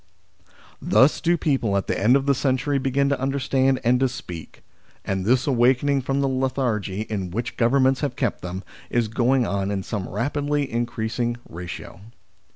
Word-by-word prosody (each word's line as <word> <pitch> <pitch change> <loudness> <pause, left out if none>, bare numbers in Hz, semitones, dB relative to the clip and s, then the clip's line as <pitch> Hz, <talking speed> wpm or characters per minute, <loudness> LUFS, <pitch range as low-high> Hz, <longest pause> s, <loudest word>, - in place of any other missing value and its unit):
Thus 135 +3 +4
do 170 +1 +2
people, 130 -10 +1
at 100 - -1
the - - -1
end 120 +6 +5
of 135 0 +1
the 140 - +4
century, 135 +1 0
begin 135 +1 +1
to 140 -2 -1
understand 135 -1 +1
and 125 +1 +3
to 135 0 +2
speak. 90 -11 -9 0.4
And 95 -1 -2
this 125 +3 +3
awakening 135 +2 +3
from 135 +2 -1
the 140 - +2
lethargy 130 -7 -1
in 105 -4 -3
which 115 +6 -4
Govern 130 +3 +3
ments 130 -1 +2
have 140 -4 -2
kept 130 -3 -1
them, 90 +1 -5 0.3
is 120 -2 +1
going 125 +3 +2
on 100 -2 -1
in 100 -2 -2
some 100 -2 -4
rapidly 145 +5 -1
increasing 120 0 -2
ratio. 85 +1 -8
125 Hz, 170 wpm, -23 LUFS, 110-135 Hz, 0.4 s, end